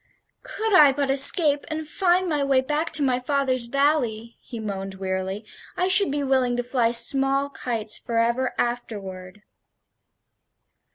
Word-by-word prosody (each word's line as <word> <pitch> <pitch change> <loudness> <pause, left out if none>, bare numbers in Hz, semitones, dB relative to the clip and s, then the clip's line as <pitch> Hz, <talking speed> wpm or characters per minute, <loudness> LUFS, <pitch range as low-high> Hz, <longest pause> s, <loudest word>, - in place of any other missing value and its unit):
"Could 440 -1 -4
I 300 -6 +7
but 275 0 -2
escape 285 +1 +3
and 310 -1 -6
find 365 +2 0
my 300 -4 -1
way 275 -1 +2
back 300 +5 -3
to 305 -2 +4
my 255 -2 0
father's 255 -2 -1
valley," 240 -4 -1
he 235 - -9
moaned, 195 -2 -6
wearily, 190 +2 -5 0.3
"I 365 +1 0
should 380 +1 +5
be 285 +1 -3
willing 260 -3 0
to 245 - -2
fly 245 -1 0
small 270 +4 +3
kites 225 -5 -4
forever 235 +2 -1
afterward." 205 -5 -5
260 Hz, 145 wpm, -23 LUFS, 230-290 Hz, 0.3 s, I